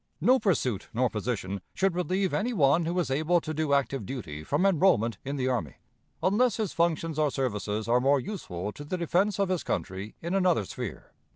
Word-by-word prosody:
No 260 Hz, +1 st, +4 dB
pursuit 130 Hz, -, 0 dB
nor 125 Hz, 0 st, +2 dB
position 100 Hz, -3 st, -3 dB
should 190 Hz, -1 st, +2 dB
relieve 185 Hz, +2 st, 0 dB
any 240 Hz, +4 st, 0 dB
one 160 Hz, -2 st, +3 dB
who 170 Hz, +2 st, -1 dB
is 170 Hz, -6 st, 0 dB
able 160 Hz, +6 st, +2 dB
to 155 Hz, -1 st, -5 dB
do 155 Hz, -1 st, -1 dB
active 140 Hz, -3 st, +1 dB
duty 90 Hz, -, -6 dB
from 145 Hz, -, +1 dB
enrollment 170 Hz, -, +3 dB
in 140 Hz, +1 st, -3 dB
the 130 Hz, -2 st, -1 dB
army, 115 Hz, -, -1 dB, 0.5 s
unless 220 Hz, +4 st, +3 dB
his 215 Hz, -5 st, -2 dB
functions 165 Hz, -2 st, 0 dB
or 150 Hz, -1 st, +3 dB
services 110 Hz, -5 st, -2 dB
are 120 Hz, +1 st, +3 dB
more 140 Hz, +2 st, +4 dB
useful 105 Hz, -, -5 dB
to 145 Hz, -, -9 dB
the 165 Hz, +5 st, -3 dB
defense 185 Hz, +5 st, +1 dB
of 200 Hz, -2 st, +1 dB
his 185 Hz, -3 st, 0 dB
country 95 Hz, +2 st, -4 dB
in 170 Hz, +2 st, -4 dB
another 180 Hz, -, +2 dB
sphere. -, -, -7 dB
150 Hz, 195 wpm, -28 LUFS, 120-185 Hz, 0.5 s, No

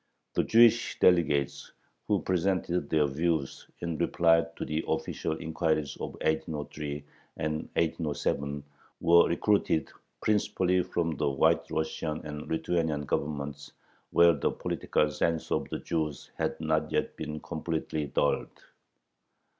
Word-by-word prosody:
The -, -, +3 dB
Jewish 115 Hz, 0 st, +5 dB
delegates 75 Hz, -7 st, +2 dB, 0.3 s
who 105 Hz, -3 st, +1 dB
presented 90 Hz, -3 st, 0 dB
their 75 Hz, -2 st, +3 dB
views 75 Hz, 0 st, -1 dB
in 85 Hz, -2 st, -3 dB
reply 85 Hz, -1 st, +3 dB
to -, -, -4 dB
the 75 Hz, +1 st, -2 dB
official -, -, -1 dB
inquiries 80 Hz, -3 st, -1 dB
of -, -, -5 dB
1803 75 Hz, -2 st, -2 dB, 0.3 s
and 75 Hz, 0 st, -1 dB, 0.2 s
1807 75 Hz, -3 st, -1 dB, 0.4 s
were 85 Hz, 0 st, +6 dB
recruited 85 Hz, -2 st, +1 dB, 0.3 s
principally 95 Hz, -, +2 dB
from 85 Hz, -3 st, -2 dB
the 75 Hz, -1 st, +1 dB
White 65 Hz, -1 st, +2 dB
Russian 80 Hz, 0 st, -2 dB
and 75 Hz, 0 st, -6 dB
Lithuanian 80 Hz, -2 st, 0 dB
Governments, 70 Hz, 0 st, -3 dB, 0.4 s
where 85 Hz, 0 st, +6 dB
the 70 Hz, -, 0 dB
political 75 Hz, -, 0 dB
sense 80 Hz, +1 st, -1 dB
of -, -, 0 dB
the -, -, -2 dB
Jews 80 Hz, -4 st, -3 dB
had -, -, -2 dB
not 80 Hz, -1 st, 0 dB
yet -, -, -1 dB
been 75 Hz, 0 st, -5 dB
completely 80 Hz, -2 st, -3 dB
dulled. -, -, +1 dB
80 Hz, 120 wpm, -29 LUFS, 75-85 Hz, 0.4 s, were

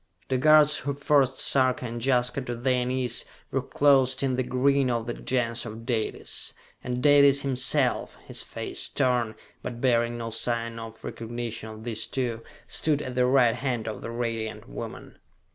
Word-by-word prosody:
The 130 Hz, -1 st, +1 dB
guards 150 Hz, +1 st, +6 dB
who 140 Hz, -, -2 dB
forced 140 Hz, -1 st, +2 dB
Sarka 130 Hz, -2 st, +2 dB
and 120 Hz, -1 st, -5 dB
Jaska 125 Hz, 0 st, +1 dB
to 120 Hz, -2 st, -4 dB
their 125 Hz, +1 st, +1 dB
knees, 125 Hz, -1 st, 0 dB, 0.3 s
were -, -, 0 dB
clothed 135 Hz, -2 st, +3 dB
in 130 Hz, -2 st, +1 dB
the 130 Hz, -, 0 dB
green 130 Hz, +1 st, +2 dB
of 115 Hz, -2 st, -1 dB
the 120 Hz, -, -3 dB
Gens 120 Hz, -2 st, -1 dB
of 115 Hz, 0 st, -8 dB
Dalis, 115 Hz, -4 st, -3 dB, 0.3 s
and 125 Hz, 0 st, -3 dB
Dalis 140 Hz, -1 st, +6 dB
himself, 135 Hz, 0 st, +1 dB
his -, -, -4 dB
face -, -, -6 dB
stern, 120 Hz, -3 st, +1 dB, 0.3 s
but 120 Hz, -, -6 dB
bearing 120 Hz, -2 st, +2 dB
no 115 Hz, -1 st, -5 dB
sign 115 Hz, 0 st, -1 dB
of 115 Hz, 0 st, -10 dB
recognition 115 Hz, -1 st, -5 dB
of 110 Hz, 0 st, -10 dB
these 110 Hz, -2 st, -2 dB
two, 120 Hz, -4 st, -2 dB, 0.2 s
stood 150 Hz, -2 st, 0 dB
at 130 Hz, -, -5 dB
the 125 Hz, 0 st, +2 dB
right 125 Hz, -3 st, +4 dB
hand 120 Hz, -2 st, -2 dB
of 110 Hz, -, -5 dB
the -, -, -6 dB
Radiant 115 Hz, -2 st, -4 dB
Woman! -, -, -8 dB
125 Hz, 170 wpm, -26 LUFS, 115-135 Hz, 0.3 s, guards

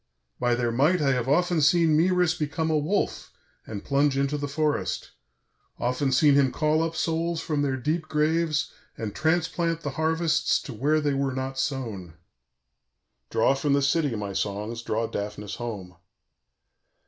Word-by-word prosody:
By 120 Hz, -1 st, +2 dB
their 120 Hz, -1 st, 0 dB
might 150 Hz, +10 st, +3 dB
I 140 Hz, -3 st, +2 dB
have 125 Hz, -1 st, -1 dB
often 175 Hz, +2 st, +2 dB
seen 160 Hz, +1 st, +4 dB
Mœris 180 Hz, +1 st, +2 dB
become 160 Hz, +2 st, -1 dB
a 155 Hz, -, +3 dB
wolf 180 Hz, +8 st, -1 dB, 0.4 s
and 105 Hz, -2 st, -7 dB
plunge 140 Hz, 0 st, +2 dB
into 140 Hz, +1 st, 0 dB
the 145 Hz, 0 st, -3 dB
forest, 150 Hz, +1 st, -1 dB, 0.7 s
often 125 Hz, +3 st, 0 dB
seen 145 Hz, +3 st, +5 dB
him 140 Hz, -2 st, +4 dB
call 155 Hz, +1 st, +1 dB
up 165 Hz, 0 st, -2 dB
souls 165 Hz, +1 st, -1 dB
from 150 Hz, -3 st, -1 dB
their 135 Hz, -2 st, 0 dB
deep 155 Hz, +5 st, -2 dB
graves 155 Hz, 0 st, +1 dB, 0.3 s
and 110 Hz, -3 st, -4 dB
transplant 165 Hz, -, 0 dB
the 145 Hz, -, -3 dB
harvests 160 Hz, -1 st, +2 dB
to 130 Hz, -, -7 dB
where 150 Hz, +7 st, +1 dB
they 145 Hz, -1 st, 0 dB
were 135 Hz, -1 st, -1 dB
not 130 Hz, 0 st, -3 dB
sown. 110 Hz, -, -3 dB, 1.1 s
"_Draw 125 Hz, +4 st, +2 dB
from 140 Hz, +1 st, 0 dB
the 140 Hz, -, +3 dB
city, 145 Hz, -3 st, +1 dB
my 100 Hz, -2 st, -4 dB
songs, 105 Hz, +4 st, -3 dB
draw 115 Hz, 0 st, -1 dB
Daphnis 105 Hz, -1 st, -5 dB
home. 100 Hz, -7 st, -6 dB
145 Hz, 160 wpm, -26 LUFS, 125-160 Hz, 1.1 s, seen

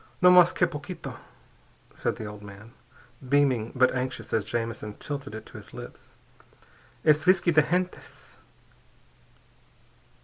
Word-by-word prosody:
"No 180 Hz, 0 st, +7 dB
mas 180 Hz, -1 st, +7 dB
que 180 Hz, -, +2 dB
poquito!" 150 Hz, -4 st, -7 dB, 0.7 s
said -, -, -2 dB
the 110 Hz, -, -7 dB
old 105 Hz, 0 st, -8 dB
man, 105 Hz, +2 st, -12 dB, 0.6 s
beaming 130 Hz, -5 st, +2 dB
but 130 Hz, 0 st, +4 dB
anxious 130 Hz, 0 st, -4 dB
as 110 Hz, -, +2 dB
Jamison 115 Hz, -1 st, -4 dB
tilted 140 Hz, -5 st, -6 dB
it 110 Hz, -, -8 dB
to -, -, -12 dB
his -, -, -15 dB
lips. -, -, -11 dB, 0.9 s
"_Es 155 Hz, -1 st, +5 dB
visky 180 Hz, 0 st, +4 dB
de 155 Hz, -, +6 dB
gentes.... 180 Hz, +4 st, -4 dB
135 Hz, 130 wpm, -27 LUFS, 115-165 Hz, 0.9 s, No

